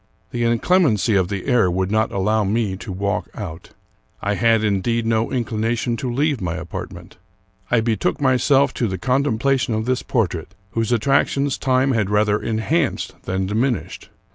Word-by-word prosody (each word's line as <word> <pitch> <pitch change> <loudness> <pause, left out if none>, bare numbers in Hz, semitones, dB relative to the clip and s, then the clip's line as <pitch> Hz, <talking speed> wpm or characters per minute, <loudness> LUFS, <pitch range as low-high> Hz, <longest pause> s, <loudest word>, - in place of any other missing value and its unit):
The 120 - -2
inclemency 115 - +2
of 95 -2 +2
the 100 -1 -4
air 120 -8 +3
would 95 +2 -1
not 110 +1 +1
allow 105 +3 +1
me 105 -1 0
to 100 +2 -8
walk 100 +2 -2
out. 90 -7 -7 0.5
I 100 - -1
had, 115 +2 +3
indeed, 110 +3 0
no 115 0 +1
inclination 115 0 -1
to 125 0 -3
leave 140 0 0
my 85 -2 -2
apartment. 85 +2 -8 0.5
I 120 -2 +3
betook 110 -2 0
myself 135 +1 +3
to 120 - +1
the 95 -2 -3
contempla 135 +1 +1
tion 120 -2 -1
of 110 0 -2
this 130 0 0
portrait, 95 - -2 0.2
whose 115 0 -1
attractions 140 +3 +2
time 130 +1 +2
had 110 -6 0
rather 105 0 +2
enhanced 130 +8 -1
than 95 +1 -1
diminished. 115 +6 -2
115 Hz, 165 wpm, -21 LUFS, 100-125 Hz, 0.5 s, air